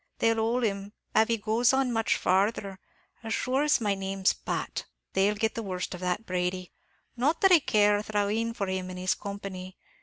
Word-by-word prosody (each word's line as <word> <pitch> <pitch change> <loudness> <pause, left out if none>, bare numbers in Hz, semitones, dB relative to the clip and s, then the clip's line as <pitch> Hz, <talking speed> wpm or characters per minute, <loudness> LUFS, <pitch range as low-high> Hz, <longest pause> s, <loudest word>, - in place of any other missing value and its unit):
They'll 225 0 +2
hole 230 +3 +1
him, 200 -1 -2 0.2
av 220 - +5
he 230 - +1
goes 225 +4 +2
on 265 -2 +2
much 225 -1 +1
farthur, 195 +1 0 0.4
as 225 -1 -2
shure 260 +2 0
as 300 0 +3
my 210 -3 +1
name's 195 0 0
Pat." - - -4 0.3
"They'll 195 +2 +2
get 220 +1 0
the 230 - -4
worst 185 -4 -4
of 180 - -7
that, 180 +4 -1
Brady 180 -1 -2 0.4
not 280 +7 +1
that 385 - +6
I 350 - +8
care 210 -6 +3
a - - -2
thrawneen 215 +2 -1
for 200 - -1
him 185 -1 -3
and 180 - -7
his 185 0 +1
company. 195 -2 -7
205 Hz, 200 wpm, -28 LUFS, 190-230 Hz, 0.4 s, I